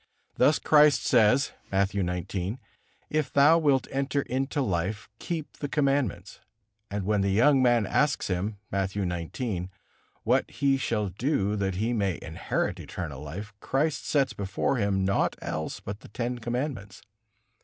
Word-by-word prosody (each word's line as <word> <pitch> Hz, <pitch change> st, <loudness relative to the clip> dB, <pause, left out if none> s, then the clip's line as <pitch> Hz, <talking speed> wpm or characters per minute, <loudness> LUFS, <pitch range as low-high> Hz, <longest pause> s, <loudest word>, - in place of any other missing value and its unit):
Thus 150 Hz, -, +4 dB
Christ 150 Hz, -1 st, +5 dB
says, 125 Hz, +3 st, +4 dB, 0.2 s
Matthew 100 Hz, 0 st, +1 dB
xix, 90 Hz, +4 st, -3 dB, 0.5 s
"If 155 Hz, -2 st, 0 dB
thou 150 Hz, +4 st, +6 dB
wilt 140 Hz, -5 st, +2 dB
enter 140 Hz, +1 st, 0 dB
into 135 Hz, +4 st, -2 dB
life, 100 Hz, -3 st, -1 dB
keep 160 Hz, -3 st, -5 dB
the 145 Hz, -, -4 dB
commandments." 135 Hz, -, 0 dB, 0.5 s
And 100 Hz, -1 st, -3 dB
when 105 Hz, 0 st, +2 dB
the 100 Hz, -, +1 dB
young 130 Hz, +8 st, +4 dB
man 120 Hz, -3 st, +4 dB
asks 150 Hz, +8 st, +1 dB
Him, 100 Hz, +3 st, -2 dB
Matthew 100 Hz, +1 st, -1 dB
xix, 90 Hz, +3 st, -3 dB, 0.6 s
what -, -, +2 dB
he 140 Hz, -1 st, +1 dB
shall 105 Hz, -6 st, -1 dB
do 105 Hz, -, 0 dB
that 95 Hz, -2 st, -1 dB
he 110 Hz, +5 st, 0 dB
may 100 Hz, -5 st, 0 dB
inherit -, -, -2 dB
eternal 75 Hz, -6 st, -6 dB
life, 95 Hz, +8 st, -7 dB
Christ 145 Hz, +6 st, -1 dB
sets 140 Hz, -3 st, +2 dB
before 100 Hz, +6 st, -1 dB
him 100 Hz, -3 st, +1 dB
naught 100 Hz, -, +1 dB
else 80 Hz, +6 st, -4 dB
but 100 Hz, +1 st, -7 dB
the -, -, -14 dB
Ten 120 Hz, +3 st, -3 dB
Commandments. 120 Hz, -4 st, -4 dB
110 Hz, 145 wpm, -27 LUFS, 95-135 Hz, 0.6 s, thou